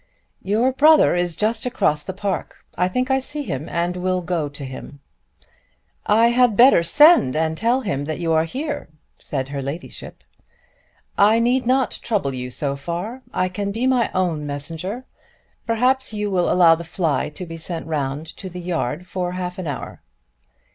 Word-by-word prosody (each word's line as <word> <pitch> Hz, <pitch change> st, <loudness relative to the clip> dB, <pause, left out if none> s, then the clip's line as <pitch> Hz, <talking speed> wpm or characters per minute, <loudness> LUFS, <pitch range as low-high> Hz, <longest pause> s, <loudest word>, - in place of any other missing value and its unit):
"Your 220 Hz, +7 st, +1 dB
brother 305 Hz, -, +5 dB
is 175 Hz, -2 st, 0 dB
just 225 Hz, +3 st, 0 dB
across 150 Hz, -11 st, +1 dB
the -, -, -5 dB
park. 195 Hz, -1 st, -4 dB
I 180 Hz, -, +1 dB
think 250 Hz, +8 st, -1 dB
I 265 Hz, -, +3 dB
see 290 Hz, +3 st, -4 dB
him 140 Hz, -, -5 dB
and 175 Hz, +1 st, -1 dB
will 185 Hz, 0 st, -1 dB
go 165 Hz, -4 st, -2 dB
to 145 Hz, 0 st, -8 dB
him." 130 Hz, +2 st, -9 dB, 1.1 s
"I 225 Hz, +3 st, +5 dB
had 240 Hz, -3 st, +3 dB
better 250 Hz, -6 st, +7 dB
send 290 Hz, -, +6 dB
and 160 Hz, 0 st, 0 dB
tell 235 Hz, +8 st, +1 dB
him 160 Hz, -, -3 dB
that 155 Hz, +1 st, -4 dB
you 165 Hz, -2 st, 0 dB
are 160 Hz, 0 st, +3 dB
here," 285 Hz, -, -5 dB, 0.3 s
said 135 Hz, -2 st, -4 dB
her 140 Hz, -1 st, -4 dB
ladyship. 140 Hz, +6 st, -8 dB, 1.0 s
"I 210 Hz, +3 st, +5 dB
need 245 Hz, +2 st, +1 dB
not 260 Hz, 0 st, +1 dB
trouble 195 Hz, -, -1 dB
you 125 Hz, 0 st, -5 dB
so 140 Hz, +2 st, -2 dB
far. 175 Hz, -, -5 dB
I 185 Hz, -, 0 dB
can 200 Hz, +2 st, -3 dB
be 230 Hz, +5 st, -2 dB
my 255 Hz, -3 st, +2 dB
own 165 Hz, -5 st, -1 dB
messenger. 165 Hz, -, -4 dB, 0.6 s
Perhaps 250 Hz, +1 st, +1 dB
you 210 Hz, -1 st, -2 dB
will 180 Hz, -2 st, +1 dB
allow 175 Hz, -2 st, +6 dB
the 165 Hz, +1 st, -3 dB
fly 165 Hz, -2 st, -1 dB
to 150 Hz, +5 st, -8 dB
be 165 Hz, -1 st, -8 dB
sent 165 Hz, 0 st, -3 dB
round 145 Hz, -1 st, -3 dB
to 190 Hz, -, -6 dB
the 180 Hz, 0 st, -8 dB
yard 175 Hz, -2 st, -3 dB
for 180 Hz, -1 st, -3 dB
half 180 Hz, 0 st, -5 dB
an 180 Hz, -, -4 dB
hour." 145 Hz, -, -6 dB
180 Hz, 175 wpm, -21 LUFS, 160-230 Hz, 1.1 s, better